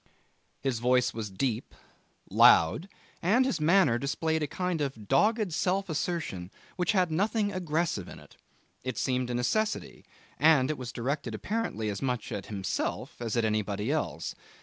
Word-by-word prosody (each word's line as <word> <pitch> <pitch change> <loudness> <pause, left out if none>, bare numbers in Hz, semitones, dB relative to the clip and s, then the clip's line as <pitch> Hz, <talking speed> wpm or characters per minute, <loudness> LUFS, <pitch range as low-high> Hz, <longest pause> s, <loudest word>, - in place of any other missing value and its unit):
His 130 -4 0
voice 125 +1 +2
was 110 -2 -4
deep, 115 +4 -2 0.6
loud, 95 - +5 0.3
and 225 +9 +4
his 260 -11 -1
manner 160 -7 +4
displayed 160 +4 -1
a 150 - 0
kind 180 +1 -2
of 130 -7 -4
dogged 215 - +2
self 190 +4 0
assertion 150 - -2 0.3
which 180 +3 +1
had 180 -4 +2
nothing 205 +4 +1
aggressive 165 - -1
in - - -10
it. - - -16 0.5
It 130 0 -4
seemed 125 -2 0
a 120 - -1
necessity, 215 - -1 0.4
and 150 -2 +5
it 155 - -4
was 125 -1 -5
directed 130 -1 -3
apparently 210 - -2
as 100 -1 -4
much 125 -4 -2
at 100 -2 -4
himself 100 +3 -3
as 115 0 -2
at 115 - +2
anybody 105 +1 -1
else. 155 0 -2
140 Hz, 155 wpm, -29 LUFS, 115-180 Hz, 0.6 s, loud